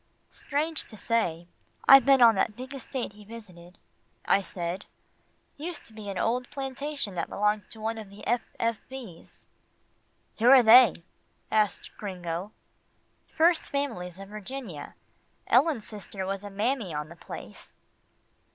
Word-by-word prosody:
"Strange 305 +2 -2
to 215 - -11
say, 175 -8 0 0.4
I've 270 -2 +9
been 270 -2 +7
on 230 -1 +8
that 210 +1 0
big 255 +3 -8
estate 260 -4 -5
he 210 0 -14
visited," 185 -5 -12 0.5
I 200 - +4
said, 180 0 -4 0.7
"used 330 +3 -6
to 225 - -13
be 215 -2 -8
an 195 - -4
old 245 +5 0
plantation 275 -4 -3
that 170 -2 -3
belonged 210 +1 0
to 220 - -10
one 225 +1 -2
of 215 -3 -9
the 200 +1 -12
F. 240 +1 +2 0.2
F. 230 -1 +1
V.'s." 240 -11 -11 0.9
"Who 235 +3 +5
are 265 -2 +9
they?" 230 -5 +7 0.5
asked 215 -3 +1
Gringo. 180 -1 -4 0.8
"First 330 +1 +2
Families 225 -11 -3
of 195 0 -10
Virginia 210 - -7 0.5
Ellen's 270 -4 +3
sister 200 -2 -6
was 195 +1 -3
a 205 - -6
mammy 205 - -1
on 150 +1 -4
the 170 - -11
place." - - -11
220 Hz, 145 wpm, -28 LUFS, 195-260 Hz, 0.9 s, I've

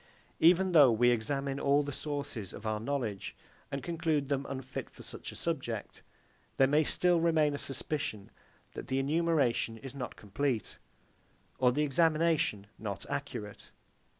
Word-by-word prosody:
Even 180 +3 +5
though 145 -7 +7
we 120 +2 +4
examine 135 +4 -1
all 140 +1 +3
the 145 - -4
sources 140 -9 -4
of 110 - -9
our 110 -1 -1
knowledge, 115 -5 -3 0.4
and 140 -1 -3
conclude 160 -4 -1
them 140 -1 -1
unfit 130 -1 -5
for - - -14
such - - -7
a - - -11
subject, 130 -10 -4 0.6
there 135 - +6
may 150 +3 +3
still 175 +2 +3
remain 160 -3 +3
a 145 - -3
suspicion, 135 -6 -2 0.4
that - - -7
the 130 - 0
enumeration 140 -6 +1
is 135 +2 -9
not 130 -3 -6
complete, 110 +3 -2 0.8
or 125 -1 +5
the 150 +4 +1
examination 155 -6 +2
not - - -5
accurate. 105 -1 -5
140 Hz, 150 wpm, -31 LUFS, 120-155 Hz, 0.8 s, though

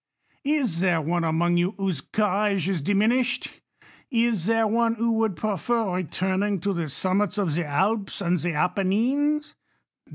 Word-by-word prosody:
Is 265 - +1
there 175 -2 +2
one 170 +3 -1
among 170 +2 +1
you 180 +3 0
whose 190 -7 -2
courage 205 -3 0
is 190 -5 -1
diminished? 220 - +1 0.6
Is 230 -7 +1
there 225 0 +3
one 230 +1 +1
who 230 +1 0
would 220 -4 +1
prefer 215 +1 -1
returning 190 +3 -1
to 200 +2 0
the 170 -4 -3
summits 190 +8 0
of 190 -7 0
the 165 0 -1
Alps 195 +7 0
and 180 -2 0
the 175 +2 -2
Appenines 230 - 0
195 Hz, 150 wpm, -25 LUFS, 175-225 Hz, 0.6 s, there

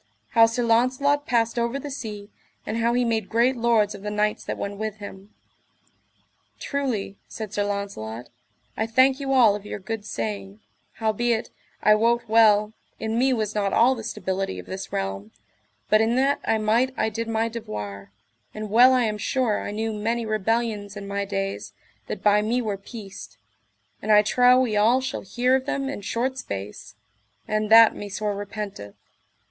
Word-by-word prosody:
How 230 -1 +6
Sir 235 +2 -2
Launcelot 255 +5 +2
passed 230 -1 +1
over 235 +3 -1
the 285 +1 -7
sea, 210 -6 -7 0.3
and 220 - -3
how 235 +1 +1
he 245 0 +2
made 220 -3 -1
great 240 +3 +2
lords 230 -3 +2
of - - -10
the 210 - -4
knights 210 0 -1
that - - -4
went 200 0 -5
with 215 -1 -3
him. 200 -1 -10 1.3
Truly, 245 -9 -3
said 220 -2 -7
Sir 205 - 0
Launcelot, 195 - -5 0.5
I 220 - -1
thank 260 +4 +4
you 275 -1 -3
all 235 -6 +5
of 205 - -7
your 210 - -6
good 215 +2 -5
saying, 105 - -5 0.3
howbeit, 225 +1 -1 0.3
I 215 - +6
wot 235 +2 +2
well, 215 -1 +4 0.3
in 225 +1 -1
me 265 +1 +3
was 215 -4 -1
not 200 -2 -1
all 245 +3 +5
the 230 -4 -7
stability 190 - -3
of 90 - -8
this 190 0 -7
realm, 95 +2 -4 0.5
but 215 0 +4
in 225 +2 +2
that 275 +2 +2
I 225 - +2
might 230 +5 +1
I 220 - +1
did 230 +1 -4
my 225 0 0
devoir; 105 - -7 0.4
and 215 -1 -6
well 250 +4 +7
I 255 -1 +3
am 210 -2 -2
sure 240 -1 0
I - - -5
knew 220 +2 -3
many 225 +2 -2
rebellions 215 -1 -1
in 200 -1 -7
my 200 0 -2
days 195 - -4 0.3
that 195 - -6
by 210 0 +4
me 230 +4 0
were 215 -4 -2
peaced, 200 0 -10 0.6
and 215 - -1
I 210 0 +7
trow 250 +4 +5
we 235 -5 0
all 225 +5 +4
shall 260 - -4
hear 245 +6 +1
of 265 0 -2
them 275 -1 -2
in 275 - -5
short 255 +6 -2
space, 100 - -7 0.5
and 215 0 -1
that 225 0 +8
me 205 - -7
sore 205 +1 -2
repenteth. 200 - -7
220 Hz, 180 wpm, -24 LUFS, 200-235 Hz, 1.3 s, that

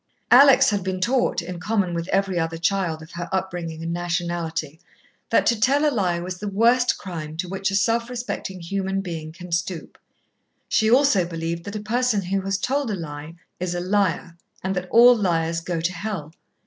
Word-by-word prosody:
Alex 270 -2 +7
had 200 -2 -1
been 185 0 -2
taught, 240 -3 +1
in 175 0 -6
common 200 -2 0
with 170 0 -3
every 195 -2 0
other 165 0 -2
child 170 -2 -1
of 160 - -14
her 170 0 -6
upbringing 175 -4 -3
and 165 0 -3
nationality, 170 -3 -3 0.5
that - - +3
to 235 -2 +2
tell 280 +6 +3
a 295 - +1
lie 180 -6 0
was 180 +1 -6
the 210 - -5
worst 235 +5 +3
crime 160 -5 -7
to 180 +2 -3
which 195 +1 -2
a 195 - -2
self 230 +5 +1
respecting 240 -6 -5
human 195 +2 -2
being 165 -4 -6
can 180 +1 -11
stoop. 170 0 -3 0.7
She 220 -1 +2
also 250 -6 +4
believed 170 0 -4
that 200 - -6
a - - -2
person 235 -2 +1
who 195 +2 -1
has 195 0 -1
told 270 +5 -1
a 210 - -1
lie 155 -1 -7 0.2
is 175 -1 -2
a - - -1
liar, 185 -2 0 0.3
and 190 +1 -1
that 180 0 -4
all 245 +2 +7
liars 165 -5 0
go 170 0 -3
to 170 +2 -1
Hell. 175 -5 -5
185 Hz, 195 wpm, -23 LUFS, 170-210 Hz, 0.7 s, Alex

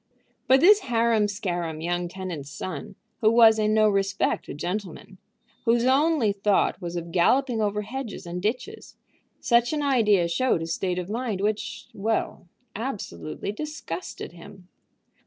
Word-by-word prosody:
But 265 +2 +5
this 410 +5 +7
harum 230 - +2
scarum 175 -6 -3
young 175 +2 -2
tenant's 175 -6 -6
son, 155 -2 -6 0.2
who 220 - +4
was 225 -1 +6
in 215 0 +2
no 215 0 +4
respect 195 -1 0
a - - -4
gentleman, 185 +2 -5 0.5
whose 235 +1 +3
only 275 -3 +3
thought 200 0 +1
was 175 -1 -5
of 170 -1 -5
galloping 235 +7 +2
over 210 0 0
hedges 230 -3 -6
and 175 +1 -5
ditches, 255 - -4 0.4
such 240 +2 +2
an 300 -1 -1
idea 210 -10 +3
showed 170 0 +1
a - - -3
state 180 +2 -2
of 180 -1 -3
mind 225 -2 -3
which 210 +2 -2
well, 215 -3 -2 0.3
absolutely 195 - -5
disgusted 210 - -6
him. 180 +2 -14
210 Hz, 145 wpm, -25 LUFS, 175-235 Hz, 0.5 s, this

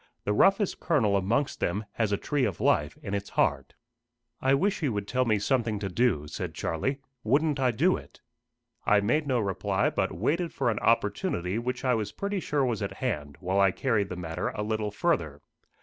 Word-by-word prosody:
The 105 - 0
roughest 195 - +3
kernel 120 - +2
amongst 115 +9 0
them 100 +5 -1
has 110 0 -1
a 100 - +2
tree 145 +4 -1
of 100 -7 -1
life - - +2
in 100 - -4
its 100 0 -3
heart." - - 0 0.7
"I 135 +1 +4
wish 195 +8 +1
he 150 - 0
would 105 -3 -3
tell 130 +3 +1
me 110 -3 +2
something 115 0 0
to 100 -1 -3
do," 95 -7 +1
said - - -5
Charlie. 130 - -1 0.3
"Wouldn't 145 +5 +2
I 130 -1 +3
do 120 - +2
it!" - - -14 0.6
I 105 - +4
made 140 +9 +1
no 130 -3 +2
reply, 100 -1 0
but 95 - 0
waited 160 - -1
for 125 -4 +1
an 105 - -2
opportunity 105 - +1
which 125 +2 -3
I 125 - +3
was 105 -3 -1
pretty 200 - -2
sure 145 -5 0
was 115 -4 -1
at 100 - -3
hand, 75 - -3
while 95 +2 0
I 100 0 +6
carried 105 -1 0
the 90 - -4
matter 85 -1 -3
a 105 - -2
little 110 0 -1
further. 90 - -1
110 Hz, 200 wpm, -28 LUFS, 100-135 Hz, 0.7 s, I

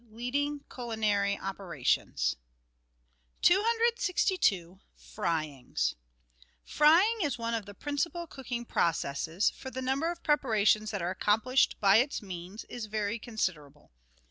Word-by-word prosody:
LEADING 280 +6 -2
CULINARY 210 -4 -1
OPERATIONS 170 - -1 1.1
123 450 -1 +2
262— 180 -1 -3 0.2
FRYINGS 155 - -2 0.7
Frying 360 +10 +4
is 290 -6 0
one 230 0 -3
of 220 -3 -3
the 205 - -10
principal 335 - -2
cooking 250 -5 -6
processes, 165 0 0
for 265 - -9
the 260 - -6
number 265 +5 0
of 340 0 -6
preparations 215 -7 +2
that 205 -5 -3
are 175 - -1
accomplished 225 +7 +2
by 200 0 +6
its 260 +5 +1
means 185 +2 -7
is 235 -3 -7
very 215 +1 -2
considerable. 155 - -4
220 Hz, 115 wpm, -30 LUFS, 195-285 Hz, 1.1 s, by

